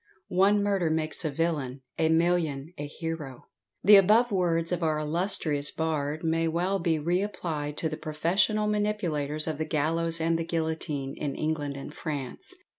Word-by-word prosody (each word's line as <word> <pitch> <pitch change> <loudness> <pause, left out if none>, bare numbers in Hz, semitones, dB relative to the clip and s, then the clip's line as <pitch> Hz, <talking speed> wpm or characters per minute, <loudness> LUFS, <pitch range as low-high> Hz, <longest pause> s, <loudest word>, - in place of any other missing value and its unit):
"One 200 +3 +4
murder 195 -5 +1
makes 155 +2 +1
a 155 - 0
villain, 140 -4 -2 0.2
a 160 -1 +3
million 165 -3 +1
a 145 - -5
hero." 155 -4 -6 0.4
The 205 +1 +9
above 215 +5 +5
words 170 -3 +1
of 180 -1 -1
our 155 -2 +1
illustrious 155 -2 0
bard 155 -1 -2
may 165 0 +1
well 180 +4 0
be 165 -1 +1
re 175 +5 +1
applied 155 -7 -3
to 160 - 0
the 155 -1 -4
professional 175 +8 +1
manipulators 180 -9 -1
of 155 -2 -3
the 155 - 0
gallows 165 +2 0
and 165 +1 +1
the - - 0
guillotine, 160 -4 -2
in 140 -2 -3
England 150 -3 -2
and 140 +2 -8
France. 145 -6 -5
160 Hz, 165 wpm, -28 LUFS, 150-175 Hz, 0.4 s, The